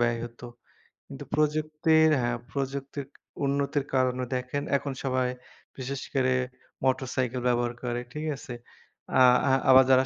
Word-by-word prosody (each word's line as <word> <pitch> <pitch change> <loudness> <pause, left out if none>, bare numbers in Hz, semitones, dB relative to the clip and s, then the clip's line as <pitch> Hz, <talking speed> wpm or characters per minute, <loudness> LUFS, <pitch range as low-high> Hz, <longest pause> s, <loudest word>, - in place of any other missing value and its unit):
ব্যয় 120 -1 +2
হত। 120 0 -11 0.7
কিন্তু - - -8
প্রযুক্তির 155 +1 +3
হ্যাঁ, 120 0 0
প্রযুক্তির 140 0 -4 0.4
উন্নতির 140 0 0
কারণে 130 -1 +1
দেখেন 125 +3 -2
এখন 140 0 -4
সবাই 130 -1 +1 0.5
বিশেষ 135 +1 -4
করে 130 -1 +2 0.5
মোটরসাইকেল 130 -1 0
ব্যবহার 120 -1 +1
করে, 120 -1 -1
ঠিক 150 +1 -4
আছে? 125 - -8 0.7
আ - - +7 0.3
আ - - +4 0.2
আবার 130 0 +9
যারা 130 0 +6
130 Hz, 130 wpm, -27 LUFS, 125-140 Hz, 0.7 s, আবার